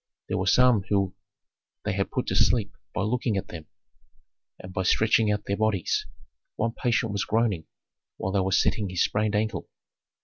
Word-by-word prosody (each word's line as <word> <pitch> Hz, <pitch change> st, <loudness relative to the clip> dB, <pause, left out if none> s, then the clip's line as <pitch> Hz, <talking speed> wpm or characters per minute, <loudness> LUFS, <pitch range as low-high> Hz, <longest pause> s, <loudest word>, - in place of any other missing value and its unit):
There -, -, 0 dB
were 95 Hz, -, -1 dB
some 125 Hz, 0 st, +5 dB
whom 100 Hz, -2 st, +1 dB, 0.7 s
they -, -, 0 dB
had -, -, -1 dB
put -, -, -2 dB
to -, -, -2 dB
sleep 110 Hz, -5 st, +2 dB, 0.2 s
by 100 Hz, -, -2 dB
looking 115 Hz, 0 st, 0 dB
at 95 Hz, -, -4 dB
them 80 Hz, -3 st, -9 dB, 0.9 s
and 95 Hz, 0 st, -10 dB
by 95 Hz, -, -1 dB
stretching 110 Hz, +3 st, +3 dB
out 105 Hz, 0 st, -2 dB
their 100 Hz, -, -1 dB
bodies; 110 Hz, -5 st, 0 dB, 0.5 s
one 115 Hz, +1 st, 0 dB
patient 115 Hz, -1 st, 0 dB
was 100 Hz, -1 st, -1 dB
groaning 110 Hz, -7 st, 0 dB, 0.5 s
while 95 Hz, -, -2 dB
they 100 Hz, -, +1 dB
were 95 Hz, 0 st, 0 dB
setting 100 Hz, +2 st, +2 dB
his 90 Hz, -1 st, +1 dB
sprained 105 Hz, 0 st, 0 dB
ankle. 110 Hz, -1 st, -1 dB
105 Hz, 175 wpm, -26 LUFS, 95-110 Hz, 0.9 s, some